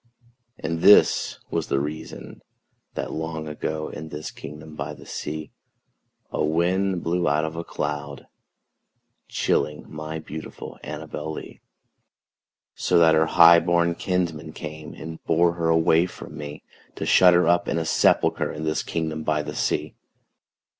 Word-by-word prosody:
And 80 +1 -3
this 105 - +6
was - - -1
the 70 - +1
reason 75 +3 -6 0.5
that, - - -3
long 80 0 -4
ago, 75 0 -3
In 80 +1 -8
this 75 0 -6
kingdom 75 +1 -10
by - - -5
the - - -14
sea, 75 +1 -5 0.8
A - - 0
wind 90 +4 +1
blew 85 -1 +1
out 75 +2 +2
of 80 0 -5
a 85 - -4
cloud, 75 -3 -4 1.0
chilling 75 +1 0
My 75 +1 -6
beautiful 80 0 -8
ANNABEL 75 0 -5
LEE; - - -9 1.1
So 90 - +1
that 80 -1 +6
her 80 0 +4
highborn 85 0 +6
kinsmen 85 -4 -2
came 75 0 -8
And 80 0 -8
bore 85 +1 +3
her 85 -1 -1
away 80 +1 +4
from 85 - -10
me, 75 -1 -7 0.3
To - - -4
shut 90 -1 +6
her 85 -1 +4
up 85 0 +3
in - - 0
a 80 - -1
sepulchre - - +2
In 75 - -6
this 80 0 0
kingdom 80 -1 -3
by 75 -1 0
the 75 0 -6
sea. - - -1
80 Hz, 145 wpm, -24 LUFS, 75-85 Hz, 1.1 s, this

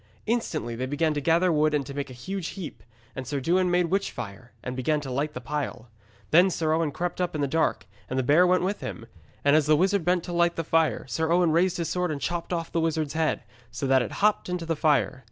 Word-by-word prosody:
Instantly 160 - -1
they 130 +2 -3
began 150 +3 +1
to 145 - -2
gather 170 +4 +3
wood 155 -1 +2
and 140 -2 0
to 140 - -7
make 140 0 -4
a - - -9
huge 185 +8 -5
heap. 180 -5 -7 0.3
And 130 -2 -6
Sir 140 +2 -2
Dewin 180 +6 +2
made 175 -1 +1
witchfire, 120 - -3
and 125 - -4
began 150 +4 0
to 135 -2 -6
light 145 +4 -2
the - - -3
pile. 125 -4 -4 0.4
Then 175 +4 +6
Sir 160 -3 0
Owen 160 -2 +1
crept 175 +4 -3
up 180 -3 -1
in 150 - -1
the 140 - +1
dark, 160 -5 0 0.2
and 130 - -2
the 130 - +1
bear 155 +8 +5
went 180 0 +3
with 200 +3 -1
him. 115 - -6 0.4
And 145 +1 +5
as 155 -2 +3
the 155 0 +5
wizard 195 +2 +2
bent 175 0 +1
to 175 - -6
light 170 0 +2
the 165 - -2
fire, 165 0 +1
Sir 160 +4 -1
Owen 175 -1 +4
raised 175 +3 +2
his 170 -2 -2
sword 180 0 0
and 150 -2 -3
chopped 175 +4 -3
off 165 -2 -2
the 165 - 0
wizard's 160 -3 -1
head, 160 -1 0 0.3
so 125 +3 -4
that 135 -1 +4
it 120 - -4
hopped 210 -2 +1
into 180 -2 -3
the 165 0 -1
fire. 145 -4 +2
160 Hz, 250 wpm, -26 LUFS, 140-175 Hz, 0.4 s, Then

